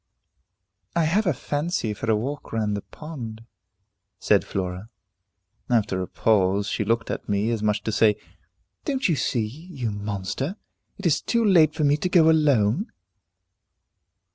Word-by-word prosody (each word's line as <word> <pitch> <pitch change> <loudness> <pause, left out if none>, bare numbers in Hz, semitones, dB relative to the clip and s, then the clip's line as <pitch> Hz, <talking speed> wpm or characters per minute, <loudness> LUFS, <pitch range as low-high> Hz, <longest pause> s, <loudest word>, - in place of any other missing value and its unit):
"I 170 - +3
have 190 +7 +2
a - - +4
fancy 145 -4 -2
for 110 +2 -5
a 110 - +4
walk 135 +7 -4
round 105 -2 0
the 100 - -3
pond," 115 -8 -9 0.7
said - - +3
Flora. 95 +2 -4 0.8
After 105 -6 +1
a 90 - -3
pause, 100 -2 +2
she 105 - -1
looked 115 +2 0
at - - -5
me, 105 +3 +1
as 115 -2 -1
much 105 -1 +1
as - - -41
to 110 - -1
say, 105 -1 +4 0.7
"Don't 275 -3 0
you 170 - +2
see, 120 -5 0
you 135 -1 -6
monster, 105 - -3 0.4
it 200 - -9
is 165 - +3
too 235 -1 +1
late 160 -7 +5
for 155 - -1
me 145 0 +4
to 180 - -2
go 160 -3 +6
alone?" 145 - +2
115 Hz, 160 wpm, -24 LUFS, 105-160 Hz, 0.8 s, go